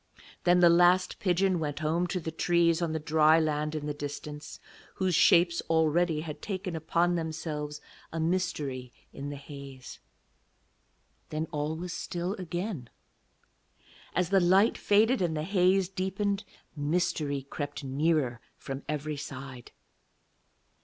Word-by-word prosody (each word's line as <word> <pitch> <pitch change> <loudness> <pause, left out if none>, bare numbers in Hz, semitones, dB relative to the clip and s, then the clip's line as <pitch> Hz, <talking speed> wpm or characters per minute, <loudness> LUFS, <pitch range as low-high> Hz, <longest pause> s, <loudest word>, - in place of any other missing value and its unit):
Then 180 0 +5
the 175 - +8
last 175 +2 +4
pigeon 185 -1 +2
went 150 -2 -3
home 165 +3 0
to 180 +1 -2
the 160 -1 -5
trees 170 +1 +2
on 170 -2 0
the 160 - -1
dry 155 +1 +4
land 150 -1 -1
in 150 -1 -3
the 150 - -2
distance, 145 +1 -7 0.4
whose 185 -1 0
shapes 170 0 +5
already 160 0 +2
had 155 -2 -7
taken 185 -4 -4
upon 170 +2 +1
themselves 155 -3 -3 0.3
a 165 - -3
mystery 155 -7 -1 0.2
in 140 +1 -6
the 145 - -5
haze. 140 -2 -10 1.3
Then 155 +1 -2
all 150 0 -2
was 175 +2 -5
still 175 +2 -3
again. 175 - -4 1.3
As 180 -1 +1
the 195 - +6
light 190 +5 +4
faded 220 +4 +3
and 165 -3 0
the 150 - -1
haze 185 +1 +3
deepened, 195 +2 -2 0.3
mystery 145 -2 0
crept 145 +1 -5
nearer 135 -3 0 0.2
from 135 0 -6
every 150 0 -2
side. 130 -3 -8
160 Hz, 135 wpm, -29 LUFS, 150-180 Hz, 1.3 s, the